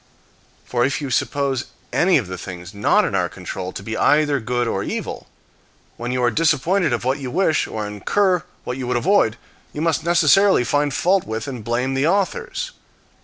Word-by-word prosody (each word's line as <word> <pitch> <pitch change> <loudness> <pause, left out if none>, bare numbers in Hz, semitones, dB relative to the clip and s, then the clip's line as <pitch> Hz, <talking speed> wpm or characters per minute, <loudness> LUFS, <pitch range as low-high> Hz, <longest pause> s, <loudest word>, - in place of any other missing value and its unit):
For 120 -1 0
if 135 +3 0
you 140 -3 -4
suppose 135 0 0 0.3
any 175 0 +4
of 125 - -1
the 95 0 -6
things 90 +1 -8
not 100 0 +3
in - - -3
our - - +2
own - - -5
control 95 -1 -6
to 95 - -8
be 110 +2 -4
either 145 +1 +3
good 120 +1 -1
or 95 - -1
evil, - - -5 0.7
when 120 +1 -4
you 125 0 0
are 120 - +3
disappointed 165 - +2
of 120 - -1
what 130 +3 0
you 135 -2 -5
wish, 160 +3 +1
or 110 -1 -4
incur 180 - +1 0.2
what 125 - -4
you 130 -2 -4
would 125 0 +1
avoid, 125 - +2 0.4
you 150 - -4
must 160 -4 +1
necessarily 175 0 +4
find 145 +3 +1
fault 190 +1 +2
with 110 0 -4
and 125 -5 -6
blame 125 +4 -1
the 135 +3 +1
authors. 205 - -1
135 Hz, 195 wpm, -21 LUFS, 120-165 Hz, 0.7 s, any